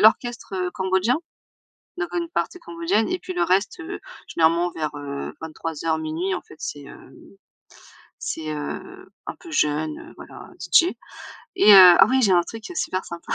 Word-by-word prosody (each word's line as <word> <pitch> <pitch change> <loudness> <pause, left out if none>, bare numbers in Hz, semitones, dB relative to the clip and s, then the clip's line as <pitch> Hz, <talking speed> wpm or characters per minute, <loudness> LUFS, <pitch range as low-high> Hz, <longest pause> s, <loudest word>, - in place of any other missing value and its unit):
l'orchestre 215 -5 +2
cambodgien. 190 +7 +1 0.8
Donc 375 -1 -2
une 340 -1 -2
partie 360 - -2
cambodgienne 335 - -1
et 365 - -1
puis 370 - -7
le 355 - 0
reste, 195 - +1
heu, 335 - -7 0.3
généralement 170 +2 +2
vers 155 -2 -3
heu 140 -1 -6
23:00-00:00 160 +2 -3
en 180 - -3
fait, - - -15
c'est 145 - -6
hem, - - -14 1.1
c'est 155 -1 -4
heu, 375 - -7 0.2
un - - -5
peu 345 - -12
jeune 150 - -1
voilà, - - -12
DJ. 350 +2 +4 0.7
Et 210 - +8
heu - - +11 0.2
ah 195 - +8
ouais 260 +2 +3
j'ai 205 - +4
un 175 -1 +5
truc, 225 +3 -9
heu, 360 - -7
super 185 -9 -2
sympa, 170 0 -6
190 Hz, 160 wpm, -23 LUFS, -, 1.1 s, heu